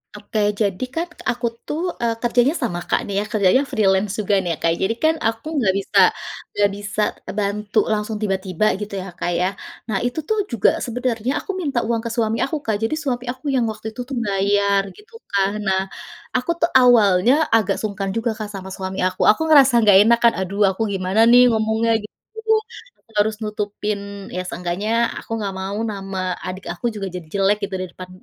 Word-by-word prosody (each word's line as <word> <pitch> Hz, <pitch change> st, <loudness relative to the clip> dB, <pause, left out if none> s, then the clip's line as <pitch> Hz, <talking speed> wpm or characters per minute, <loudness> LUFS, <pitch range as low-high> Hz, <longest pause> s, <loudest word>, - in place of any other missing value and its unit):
Oke, 210 Hz, +1 st, -4 dB, 0.2 s
jadi 200 Hz, 0 st, -1 dB
kan, 335 Hz, +2 st, -1 dB, 0.2 s
aku 240 Hz, 0 st, -1 dB, 0.2 s
tuh, 305 Hz, +2 st, -2 dB, 0.2 s
eee, 230 Hz, -1 st, +1 dB
kerjanya 245 Hz, +4 st, +3 dB
sama, 210 Hz, -9 st, -1 dB
Kak, -, -, +2 dB
nih 200 Hz, -, -4 dB
ya, 205 Hz, -, -2 dB
kerjanya 210 Hz, +3 st, +4 dB
freelance 195 Hz, -1 st, +2 dB
juga, 205 Hz, -1 st, 0 dB
nih 175 Hz, -3 st, -1 dB
ya, -, -, -21 dB
Kak. 165 Hz, -, +3 dB
Jadi 205 Hz, +4 st, +1 dB
kan, 320 Hz, +1 st, +4 dB
aku 225 Hz, +1 st, -2 dB
enggak 195 Hz, -7 st, +2 dB
bisa 195 Hz, -, +1 dB, 0.6 s
enggak 205 Hz, -1 st, +3 dB
bisa 210 Hz, +1 st, -3 dB, 0.4 s
bantu 210 Hz, +1 st, 0 dB
langsung 215 Hz, +1 st, -2 dB
tiba-tiba, 195 Hz, -2 st, -1 dB
gitu, 210 Hz, -1 st, -6 dB
ya, 190 Hz, -1 st, -5 dB
Kak, 175 Hz, 0 st, -3 dB
ya. 180 Hz, +2 st, +1 dB, 0.4 s
Nah, 195 Hz, -3 st, 0 dB
itu 245 Hz, +7 st, -2 dB
tuh 435 Hz, +8 st, -1 dB
juga 230 Hz, -5 st, +4 dB, 0.2 s
sebenarnya 245 Hz, 0 st, -2 dB
aku -, -, -3 dB
minta 285 Hz, -8 st, -1 dB
uang 230 Hz, 0 st, 0 dB
ke -, -, -1 dB
suami 225 Hz, -2 st, 0 dB
aku, 275 Hz, -, 0 dB
Kak. 220 Hz, -, 0 dB
Jadi, 225 Hz, +7 st, 0 dB
suami 250 Hz, -3 st, -2 dB
aku 255 Hz, +3 st, -13 dB
yang 245 Hz, -3 st, +2 dB
waktu 220 Hz, +1 st, -7 dB
itu 240 Hz, +3 st, -7 dB
tuh 270 Hz, -, -5 dB
bayar, 200 Hz, 0 st, +2 dB
gitu 425 Hz, +2 st, -19 dB, 0.2 s
kan. 200 Hz, +1 st, +1 dB
Nah, 190 Hz, 0 st, +2 dB, 0.5 s
aku 255 Hz, +7 st, +1 dB
tuh 335 Hz, -, +2 dB
awalnya 230 Hz, -3 st, +5 dB, 0.2 s
agak 220 Hz, -4 st, +2 dB
sungkan 200 Hz, -2 st, -3 dB
juga 230 Hz, +1 st, 0 dB
Kak, 215 Hz, -, -4 dB
sama 190 Hz, -1 st, -7 dB
suami 190 Hz, 0 st, -5 dB
aku. 185 Hz, -, -5 dB
Aku 215 Hz, -, +5 dB
ngerasa 280 Hz, -4 st, +6 dB
enggak 205 Hz, -3 st, +7 dB
enak 235 Hz, 0 st, +5 dB
kan, 235 Hz, -, +6 dB
"Aduh, 195 Hz, +2 st, 0 dB
aku 190 Hz, -, -7 dB
gimana 190 Hz, +2 st, -1 dB
nih 245 Hz, +1 st, +8 dB
ngomongnya?" 220 Hz, +1 st, +1 dB
gitu. 210 Hz, -, -9 dB, 1.0 s
Aku -, -, -24 dB
harus 215 Hz, 0 st, -2 dB
nutupin 210 Hz, 0 st, -3 dB, 0.4 s
ya, 185 Hz, -, -2 dB
seenggaknya 180 Hz, +4 st, -3 dB, 0.3 s
aku -, -, -16 dB
enggak 200 Hz, -2 st, -3 dB
mau 195 Hz, +2 st, -4 dB
nama 195 Hz, -1 st, -5 dB, 0.3 s
adik 185 Hz, +1 st, -6 dB
aku 175 Hz, -, -8 dB
juga 200 Hz, -2 st, -4 dB
jadi 180 Hz, -, -5 dB
jelek 200 Hz, +1 st, +2 dB
gitu 195 Hz, -, -3 dB
di -, -, -2 dB
depan, 185 Hz, +1 st, -10 dB
210 Hz, 195 wpm, -21 LUFS, 195-235 Hz, 1.0 s, nih